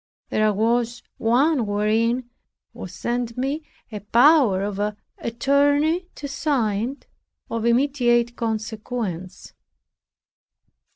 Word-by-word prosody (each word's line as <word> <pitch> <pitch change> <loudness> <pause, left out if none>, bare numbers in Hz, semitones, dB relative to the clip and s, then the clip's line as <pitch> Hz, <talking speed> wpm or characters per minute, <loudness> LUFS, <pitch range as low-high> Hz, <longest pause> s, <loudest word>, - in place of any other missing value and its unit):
There 215 0 +2
was 235 +3 0 0.2
one 250 +2 +2
wherein 225 +4 +1 0.5
was - - -8
sent 240 -1 -3
me 275 +5 -1 0.3
a 210 - -5
power 235 -1 +4
of 200 -1 -3 0.4
attorney 285 +8 +1
to 285 - -6
sign, 260 -4 -1 0.5
of 230 0 -2
immediate 240 -2 +2
consequence. 215 -4 -4
235 Hz, 90 wpm, -23 LUFS, 215-275 Hz, 0.5 s, power